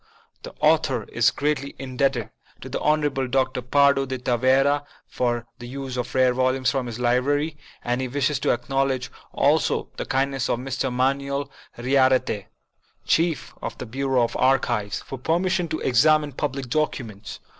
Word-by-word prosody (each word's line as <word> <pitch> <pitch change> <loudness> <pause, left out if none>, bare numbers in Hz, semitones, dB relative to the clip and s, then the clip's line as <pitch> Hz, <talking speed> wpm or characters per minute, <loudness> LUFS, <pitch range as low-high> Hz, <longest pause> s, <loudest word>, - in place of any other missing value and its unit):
The - - -10
author 150 -6 +3
is 115 +1 +3
greatly 140 -1 -2
indebted 130 -3 -1 0.3
to - - -8
the - - -3
Honorable 150 -3 +1
Dr. 130 0 0
Pardo 140 +2 +3
de 130 0 -3
Tavera 130 +4 +2 0.2
for 120 -2 -1
the 120 - -8
use 135 0 -6
of 125 0 -4
rare 130 -1 +4
volumes 130 0 +1
from 135 -3 -2
his 115 -1 -5
library, 140 +6 +1 0.3
and 120 +1 -1
he 130 - -2
wishes 140 +2 0
to - - 0
acknowledge 130 +1 0 0.2
also - - +1
the - - -3
kindness 135 -1 0
of - - +1
Mr. 130 +1 -2
Manuel 140 +2 -1 0.3
Yriarte, 130 -4 +2 0.6
Chief 165 -2 +1
of - - -5
the - - -6
Bureau 130 +1 0
of 115 - -2
Archives, 120 -5 +1
for 135 - -7
permission 175 +5 0
to 155 - -3
exam 150 +5 +4
ine 145 - -6
public 135 -1 -3
documents. 120 -9 -3
130 Hz, 155 wpm, -24 LUFS, 125-140 Hz, 0.6 s, rare